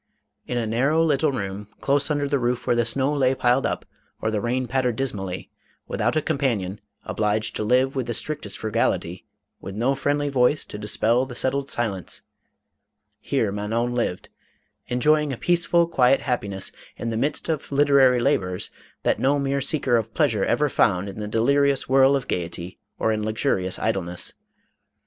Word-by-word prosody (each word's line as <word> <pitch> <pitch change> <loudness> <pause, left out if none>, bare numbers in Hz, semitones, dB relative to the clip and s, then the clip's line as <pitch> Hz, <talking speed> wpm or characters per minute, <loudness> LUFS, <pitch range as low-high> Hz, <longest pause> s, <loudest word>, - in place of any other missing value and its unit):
In 125 - -2
a 120 - 0
narrow 135 +9 +2
little 150 -1 +2
room, 100 -4 -4
close 140 +2 +1
under 145 -1 0
the 140 0 +1
roof 120 0 -1
where - - +2
the 120 -1 +2
snow 135 +5 +1
lay 135 -2 +2
piled 125 +1 +2
up, - - -3 0.3
or 110 - -1
the 105 -2 -1
rain 125 +2 0
pattered 125 -2 0
dismally; 100 -8 -4 0.4
without - - 0
a 155 - +1
companion, 115 - -1 0.2
obliged 105 0 -1
to - - -2
live 130 +5 +2
with 130 -3 -2
the 120 - -2
strictest 150 +5 -3
frugality, 105 -3 -1 0.3
with 95 - -8
no 120 +5 +1
friendly 145 +1 0
voice 135 +1 +2
to 105 - -8
dispel 115 +4 +1
the 125 - -8
settled 135 +2 -1
silence, 100 -6 -3 0.5
— - - -55 0.2
here - - 0
Manon 110 +4 -1
lived, 115 -7 -2 0.6
enjoying 150 +4 +2
a 130 - -4
peaceful, 170 +1 +2
quiet 135 -5 +3
happiness, 100 -7 -3 0.3
in 115 - -3
the - - -2
midst 140 +6 -1
of 155 -4 -3
literary 140 -3 +5
labors, 95 -9 0 0.3
that - - +1
no 140 +2 +3
mere 140 0 0
seeker 135 -3 +1
of 110 0 -4
pleasure 115 -10 +2
ever 145 +6 +2
found 100 -7 +1
in 100 - -8
the 105 - -4
delirious 140 +5 +2
whirl 135 +1 +5
of 135 -2 -2
gayety, 85 +1 -4 0.2
or 110 - +1
in 110 -1 -1
luxurious 105 -4 0
idleness. 90 -5 -2
125 Hz, 170 wpm, -24 LUFS, 110-140 Hz, 0.6 s, literary